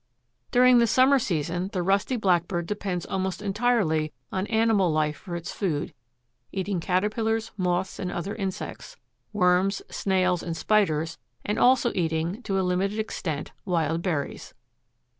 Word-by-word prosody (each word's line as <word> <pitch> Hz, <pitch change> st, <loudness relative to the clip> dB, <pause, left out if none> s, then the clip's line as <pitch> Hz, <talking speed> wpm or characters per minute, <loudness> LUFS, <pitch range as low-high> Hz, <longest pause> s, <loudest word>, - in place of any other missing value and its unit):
During 250 Hz, 0 st, +6 dB
the 235 Hz, -, +4 dB
summer 260 Hz, +4 st, +5 dB
season 175 Hz, -, -2 dB
the 180 Hz, -2 st, -1 dB
Rusty 200 Hz, +7 st, +1 dB
Blackbird 175 Hz, -4 st, +1 dB
depends 190 Hz, -3 st, -3 dB
almost 190 Hz, -1 st, -2 dB
entirely 200 Hz, -7 st, +1 dB, 0.2 s
on 190 Hz, +2 st, -2 dB
animal 220 Hz, -5 st, +3 dB
life 155 Hz, -1 st, +1 dB
for 175 Hz, -4 st, -7 dB
its 170 Hz, 0 st, -5 dB
food, 160 Hz, -8 st, -2 dB, 0.6 s
eating 190 Hz, -1 st, -2 dB
caterpillars, 220 Hz, +5 st, 0 dB
moths 180 Hz, -1 st, -1 dB
and 180 Hz, -, -3 dB
other 180 Hz, +4 st, -3 dB
insects, 200 Hz, -, -5 dB, 0.3 s
worms, 190 Hz, 0 st, +2 dB
snails 185 Hz, -2 st, +1 dB
and 165 Hz, -1 st, -4 dB
spiders, 165 Hz, -7 st, +1 dB, 0.4 s
also 250 Hz, -1 st, +4 dB
eating, 165 Hz, +4 st, -1 dB
to 195 Hz, -4 st, -1 dB
a 190 Hz, -, +1 dB
limited 190 Hz, +3 st, 0 dB
extent, 165 Hz, -8 st, -3 dB
wild 165 Hz, -3 st, 0 dB
berries. 160 Hz, -6 st, -3 dB
190 Hz, 135 wpm, -26 LUFS, 170-210 Hz, 0.6 s, During